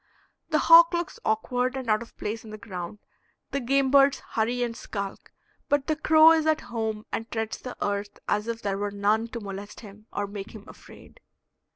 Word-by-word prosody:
The 310 Hz, -, +2 dB
hawk 335 Hz, +2 st, +7 dB
looks 345 Hz, -1 st, -3 dB
awkward 245 Hz, +4 st, 0 dB
and 260 Hz, -2 st, -5 dB
out 215 Hz, 0 st, +2 dB
of 235 Hz, -, -12 dB
place 220 Hz, +2 st, -4 dB
on 220 Hz, -, -11 dB
the 215 Hz, -, -8 dB
ground; 185 Hz, -2 st, -7 dB, 0.5 s
the 280 Hz, -, -1 dB
game 270 Hz, +1 st, +1 dB
birds 275 Hz, 0 st, +5 dB
hurry 240 Hz, +2 st, 0 dB
and 235 Hz, -1 st, -3 dB
skulk, 200 Hz, -4 st, -6 dB, 0.4 s
but 290 Hz, -1 st, +2 dB
the 310 Hz, -, 0 dB
crow 315 Hz, +1 st, +6 dB
is 320 Hz, -1 st, +2 dB
at 315 Hz, 0 st, +2 dB
home 220 Hz, -2 st, -4 dB
and 225 Hz, -, -4 dB
treads 225 Hz, -1 st, -3 dB
the 250 Hz, -, -8 dB
earth 205 Hz, 0 st, -3 dB
as 210 Hz, +2 st, 0 dB
if 230 Hz, 0 st, -4 dB
there 195 Hz, -1 st, -1 dB
were 205 Hz, 0 st, -1 dB
none 205 Hz, +3 st, +1 dB
to 235 Hz, 0 st, -6 dB
molest 200 Hz, 0 st, -8 dB
him 210 Hz, 0 st, -14 dB
or 205 Hz, -, -2 dB
make 200 Hz, +1 st, -8 dB
him 210 Hz, -1 st, -11 dB
afraid. -, -, -15 dB
225 Hz, 200 wpm, -26 LUFS, 205-275 Hz, 0.5 s, hawk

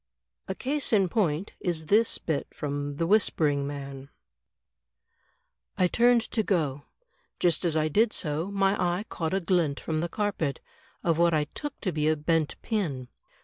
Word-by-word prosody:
'* -, -, -60 dB
A -, -, -3 dB
case 285 Hz, +2 st, -1 dB
in 195 Hz, -5 st, +3 dB
point, 185 Hz, -4 st, 0 dB
is 165 Hz, -4 st, -1 dB
this 215 Hz, +7 st, +3 dB
bit 155 Hz, -4 st, -2 dB
from 145 Hz, 0 st, -3 dB
"The 165 Hz, -, -1 dB
Whispering 155 Hz, -8 st, +2 dB
Man:'' 140 Hz, -1 st, -7 dB, 0.8 s
" -, -, -46 dB
I 185 Hz, -, +4 dB
turned 240 Hz, +4 st, +4 dB
to 225 Hz, -, +1 dB
go. 150 Hz, -9 st, -1 dB, 0.5 s
Just 175 Hz, 0 st, +2 dB
as 165 Hz, -3 st, +2 dB
I 155 Hz, 0 st, +2 dB
did 215 Hz, +8 st, +3 dB
so, 155 Hz, +3 st, -1 dB
my 195 Hz, 0 st, +2 dB
eye 175 Hz, +3 st, 0 dB
caught 165 Hz, +2 st, -2 dB
a -, -, +2 dB
glint 170 Hz, -5 st, +1 dB
from 155 Hz, -1 st, -2 dB
the 170 Hz, +2 st, -2 dB
carpet, 185 Hz, -8 st, -1 dB, 0.4 s
of 165 Hz, -1 st, +1 dB
what 170 Hz, -1 st, +4 dB
I 150 Hz, -, +2 dB
took 295 Hz, -2 st, -6 dB
to 190 Hz, -, -1 dB
be 155 Hz, -1 st, 0 dB
a 155 Hz, -, +3 dB
bent 155 Hz, 0 st, 0 dB
pin. 150 Hz, -, -2 dB
165 Hz, 175 wpm, -27 LUFS, 150-195 Hz, 0.8 s, I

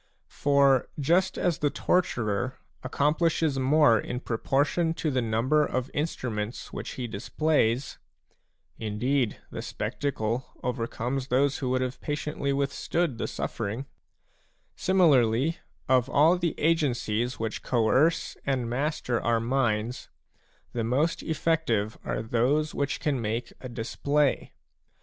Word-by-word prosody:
For 140 Hz, -2 st, +3 dB
just 175 Hz, +6 st, +2 dB
as 175 Hz, -3 st, 0 dB
the 145 Hz, -, +2 dB
torturer 125 Hz, -, 0 dB, 0.2 s
accomplishes 155 Hz, -1 st, +1 dB
more 130 Hz, -4 st, +5 dB
in 125 Hz, -, -4 dB
proportion 145 Hz, +8 st, 0 dB
to 155 Hz, -, -1 dB
the 130 Hz, -1 st, +1 dB
number 115 Hz, +7 st, +2 dB
of 130 Hz, -2 st, -2 dB
instruments 120 Hz, -7 st, -3 dB
which -, -, -5 dB
he 125 Hz, -, -4 dB
displays, 120 Hz, +3 st, 0 dB, 0.4 s
— -, -, -48 dB
indeed, 115 Hz, +3 st, 0 dB
the -, -, -5 dB
spectacle 120 Hz, -3 st, -3 dB
overcomes 125 Hz, +1 st, -2 dB
those 140 Hz, +2 st, +2 dB
who 130 Hz, -, -2 dB
would 130 Hz, 0 st, +1 dB
have 130 Hz, 0 st, -3 dB
patiently 150 Hz, -1 st, -2 dB
withstood 140 Hz, 0 st, -1 dB
the -, -, -1 dB
suffering, 115 Hz, +4 st, -4 dB, 0.5 s
— -, -, -41 dB
similarly, 150 Hz, -6 st, +3 dB, 0.3 s
of 130 Hz, 0 st, +3 dB
all 155 Hz, +5 st, +5 dB
the 175 Hz, -3 st, -2 dB
agencies 125 Hz, -7 st, +1 dB
which 110 Hz, -1 st, -3 dB
coerce 130 Hz, +7 st, +2 dB
and 130 Hz, -3 st, -1 dB
master 125 Hz, -1 st, -1 dB
our 115 Hz, -1 st, +2 dB
minds, 115 Hz, -1 st, -1 dB, 0.6 s
the 115 Hz, -, -1 dB
most 140 Hz, +9 st, +1 dB
effective 155 Hz, -10 st, 0 dB
are -, -, -2 dB
those 130 Hz, +7 st, +1 dB
which 140 Hz, 0 st, -1 dB
can 140 Hz, -5 st, 0 dB
make 115 Hz, +2 st, -3 dB
a 130 Hz, -, -6 dB
display. 140 Hz, +5 st, 0 dB
130 Hz, 125 wpm, -27 LUFS, 115-150 Hz, 0.6 s, more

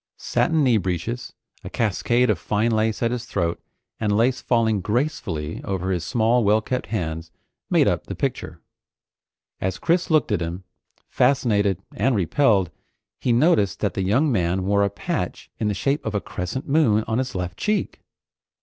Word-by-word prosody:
Satin 160 Hz, -2 st, +1 dB
knee 125 Hz, -4 st, +4 dB
breeches, 95 Hz, +6 st, -3 dB, 0.3 s
a -, -, -6 dB
cascade 120 Hz, +2 st, +1 dB
of 105 Hz, -, -2 dB
fine 110 Hz, +2 st, 0 dB
lace 110 Hz, +1 st, 0 dB
at 115 Hz, -, +1 dB
his 120 Hz, -1 st, -3 dB
throat, 85 Hz, -7 st, -2 dB, 0.4 s
and 105 Hz, -2 st, +1 dB
lace 125 Hz, +3 st, +2 dB
falling 110 Hz, -4 st, +1 dB
gracefully 105 Hz, -, -2 dB
over 95 Hz, -1 st, -2 dB
his 90 Hz, -3 st, -1 dB
small 120 Hz, +1 st, +2 dB
well 105 Hz, +1 st, +4 dB
kept 125 Hz, +3 st, -3 dB
hands 80 Hz, -6 st, -3 dB, 0.4 s
made -, -, +4 dB
up -, -, 0 dB
the -, -, -5 dB
picture. -, -, -3 dB, 1.0 s
As 95 Hz, 0 st, -2 dB
Chris 170 Hz, +1 st, +1 dB
looked 155 Hz, -7 st, +2 dB
at 100 Hz, -5 st, +1 dB
him, 85 Hz, +3 st, -4 dB, 0.4 s
fascinated 110 Hz, -8 st, +2 dB
and 120 Hz, +5 st, +1 dB
repelled, 100 Hz, -, +2 dB, 0.5 s
he 125 Hz, -, 0 dB
noticed 115 Hz, -, +3 dB
that 100 Hz, -4 st, 0 dB
the -, -, -2 dB
young 125 Hz, +11 st, +2 dB
man 90 Hz, -3 st, 0 dB
wore 100 Hz, +1 st, +2 dB
a 100 Hz, -, +2 dB
patch -, -, -4 dB
in 110 Hz, -, 0 dB
the 105 Hz, -, 0 dB
shape 140 Hz, +7 st, 0 dB
of 110 Hz, -1 st, -3 dB
a -, -, +2 dB
crescent 100 Hz, -, -5 dB
moon, 135 Hz, -8 st, +3 dB
on 110 Hz, +2 st, 0 dB
his 130 Hz, -4 st, -3 dB
left 90 Hz, -1 st, -3 dB
cheek. 210 Hz, 0 st, -1 dB
110 Hz, 170 wpm, -23 LUFS, 95-125 Hz, 1.0 s, knee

